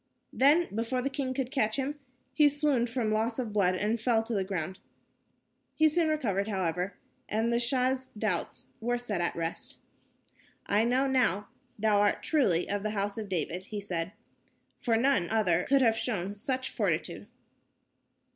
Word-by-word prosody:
Then, 300 +6 +4
before 235 +4 -1
the 275 - -1
king 270 -1 -2
could 260 -1 -2
catch 220 -6 +1
him, 280 +2 -3 0.3
he 300 -2 +5
swooned 285 -5 +1
from 230 -3 -1
loss 225 +2 0
of 235 -5 -3
blood, 185 -3 +3
and 215 +4 -1
fell 230 -2 +2
to 230 +1 -4
the 195 -3 +1
ground. 185 -2 -4 1.0
He 315 - +5
soon 325 +1 +2
recovered, 220 -11 0
however, 185 -2 -1 0.3
and 225 +2 +1
the 235 - +2
Shah's 255 +1 0
doubts 210 -5 -2
were 240 +2 0
set 215 -7 -3
at 170 - 0
rest. 165 0 -4 0.9
"I 210 +3 +2
know 255 +3 +2
now 230 -7 +1 0.3
thou 210 -1 +3
art 205 - +2
truly 200 - +2
of 205 0 -2
the 215 - -2
House 200 +2 -1
of 210 -2 -6
David," 180 +1 -2
he 210 0 -5
said, 180 -3 -3 0.7
"for 230 -4 +1
none 245 -8 +2
other 185 -6 +2
could 275 -1 +5
have 225 -2 +4
shown 205 -5 -2
such 260 +5 -2
fortitude." - - -2
225 Hz, 165 wpm, -29 LUFS, 200-260 Hz, 1.0 s, he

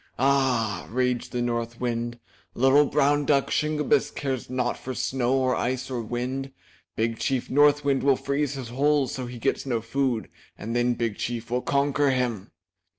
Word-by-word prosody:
*'Ah!" 125 -7 +1
raged 125 +1 -1
the 120 -1 -1
North 115 -1 -2
Wind 120 -1 -2 0.4
"Little 135 +4 +5
brown 145 0 +2
duck, 140 -1 +2
Shingebiss, 150 -1 +1
cares 135 -4 -4
not 125 -1 -1
for 130 0 -6
snow 130 0 0
or 130 -1 +2
ice 130 +2 -2
or 125 -2 -2
wind! 125 +4 -3 0.4
Big 115 0 -1
Chief 130 -3 -1
North 145 +1 +4
Wind, 140 -1 +2
will 140 -1 +4
freeze 140 +1 -1
his 130 -4 -6
holes, 140 +2 +2
so 130 -2 -4
he 120 0 -8
gets 115 - -1
no 125 -4 -1
food 120 0 -1 0.3
and 115 +3 -5
then 120 0 +2
Big 115 -3 -2
Chief 120 -1 -4
will 125 +1 +1
conquer 140 +1 +1
him." 120 -6 -1
130 Hz, 170 wpm, -25 LUFS, 120-140 Hz, 0.4 s, Little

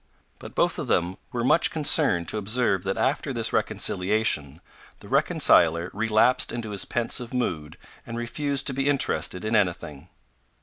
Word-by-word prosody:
But - - -11
both - - +1
of - - -4
them 90 +2 0
were 120 -1 -3
much 145 +7 +3
concerned 145 - +2
to 110 - -2
observe 105 -2 0
that 95 - -2
after - - -1
this - - -1
reconciliation, 90 -7 0 0.4
the - - -13
reconciler 85 +1 +3
relapsed 110 +4 +2
into 115 -3 -5
his 100 - -1
pensive 120 0 -2
mood 80 -12 -3 0.3
and 115 - -7
refused 140 +4 -2
to 140 - -2
be 135 +2 0
interested 125 -8 0
in 110 +1 0
anything. 85 -6 -2
110 Hz, 150 wpm, -25 LUFS, 90-125 Hz, 0.4 s, much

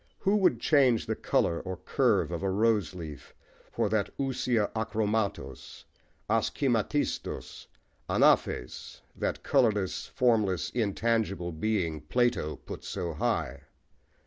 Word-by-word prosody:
Who 200 +1 +1
would 180 - +3
change 130 -3 +3
the - - -2
colour 85 - +1
or 95 -1 -5
curve 100 - +1
of 85 - -3
a 95 - 0
rose 105 -3 +1
leaf 75 -5 -9 0.4
for - - 0
that 105 -2 0
ousia 125 -5 0
akhrômatos, 110 -1 -2 0.4
askhêmatistos, 115 +4 -1 0.4
anaphês+ 60 - +1
that - - -3
colourless, 105 -8 +1
formless, 110 -9 +1
intangible, 110 -5 0
being 85 -3 -1
Plato 120 -2 0
put - - -9
so 85 -2 -4
high? 70 -1 -2
105 Hz, 110 wpm, -29 LUFS, 90-120 Hz, 0.4 s, would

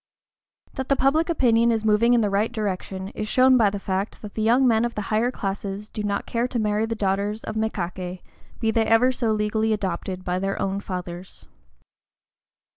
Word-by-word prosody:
That 265 - -4
public 305 +6 +2
opinion 235 -7 +3
is 220 -1 -1
moving 225 +3 +4
in 235 - +3
the 205 -2 0
right 210 +4 +1
direction 195 -3 -4
is 215 +1 -5
shown 255 +3 +5
by 225 -5 +4
the 200 - -4
fact 195 +2 -3
that 210 - -8
the 220 - -3
young 240 +4 +4
men 225 -1 +3
of 240 0 -2
the 210 - -2
higher 225 +3 +2
classes 200 -1 -4
do 215 - -5
not 200 -1 -2
care 235 +1 -1
to 250 - -3
marry 215 0 0
the 230 - -2
daughters 205 +1 -1
of - - -5
mékaké, 185 -4 -3 0.4
be 225 - +1
they 225 0 +1
ever 225 +3 +4
so 235 -3 -1
legally 215 +1 +1
adopted 185 -2 -3
by 180 0 -1
their 195 +1 -2
own 195 0 -1
fathers. 180 -2 -7
215 Hz, 195 wpm, -24 LUFS, 195-230 Hz, 0.4 s, shown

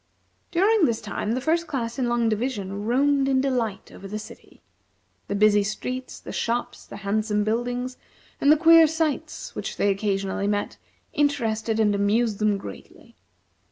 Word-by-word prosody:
During 390 +2 +3
this 230 -4 0
time 215 0 -3
the 255 - -2
First 330 +4 +1
Class 235 -2 -3
in 245 -2 0
Long 240 -1 +1
Division 210 -3 -2
roamed, 275 +3 +2
in 265 -1 +3
delight, 250 -6 -1
over 195 - -10
the 210 +2 -4
city. 215 0 -13 0.6
The 200 - -2
busy 210 0 +4
streets, 255 +5 -4
the - - -9
shops, 235 +1 -3
the - - -9
handsome 210 +1 0
buildings, 245 +3 -2 0.4
and 285 - +5
the 310 - +6
queer 330 0 +7
sights 315 -2 -2
which - - -5
they 200 - +2
occasionally 195 0 -1
met, 205 0 -2 0.3
interested 225 -6 0
and 210 -2 +3
amused 205 +2 +1
them 210 -1 +2
greatly. 100 - -11
230 Hz, 155 wpm, -24 LUFS, 210-270 Hz, 0.6 s, queer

